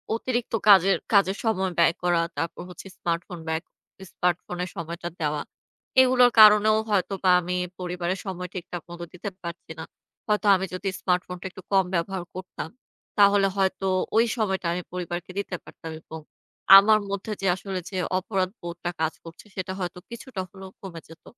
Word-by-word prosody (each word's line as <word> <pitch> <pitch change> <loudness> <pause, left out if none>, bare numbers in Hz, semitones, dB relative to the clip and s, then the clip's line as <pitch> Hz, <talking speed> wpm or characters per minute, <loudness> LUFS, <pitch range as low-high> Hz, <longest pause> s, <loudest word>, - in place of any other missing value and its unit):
অতিরিক্ত 240 0 -2
কাজের 195 -1 +7 0.2
কাজের 195 -1 +4
সময় 190 -5 0
ব্যয় 170 -1 +5
করা। 175 -1 +3 0.2
তারপর 165 - -3
হচ্ছে 180 +2 -10
স্মার্টফোন 170 +1 -3
ব্যয়, 160 0 -1 0.5
স্মার্টফোনের 180 0 -2
সময়টা 170 +1 -5
দেওয়া। 150 -1 0 0.6
এইগুলোর 250 -1 +5
কারণেও 215 0 +7
হয়তোবা 195 -2 +1
আমি 180 +1 -3 0.2
পরিবারের 180 +1 -3
সময় 180 -2 -5
ঠিকঠাক 175 -1 -6
মতো 175 0 -7
দিতে 180 +3 -5
পারছি 170 -2 -8
না। - - -4 0.4
হয়তো 210 -1 +1
আমি 190 0 -1
যদি 190 +2 -2
স্মার্টফোনটা 180 0 -1
একটু 190 - -11
কম 190 -2 +4
ব্যবহার 175 +1 -2
করতাম। 185 -3 -6 0.5
তাহলে 200 -1 +6
হয়তো 195 0 0 0.3
ওই 230 - +6
সময়টা 190 -5 0
আমি 180 - -2
পরিবারকে 175 0 -4
দিতে 195 -2 -3
পারতাম 165 - -10
এবং 160 0 -9 0.6
আমার 215 +2 +6
মধ্যে, 200 +2 -4
যে 195 - 0
আসলে 190 0 -5
যে 190 - -5 0.2
অপরাধ 190 -2 -1
বোধটা 175 0 -5
কাজ 160 0 +1
করছে 165 +5 -12
সেটা 185 0 -3
হয়তো 180 -1 -4
কিছুটা 235 -3 -6
হলেও 190 0 -11
কমে 170 -4 -8
যেত। 165 - -15
185 Hz, 155 wpm, -25 LUFS, 175-200 Hz, 0.6 s, কাজের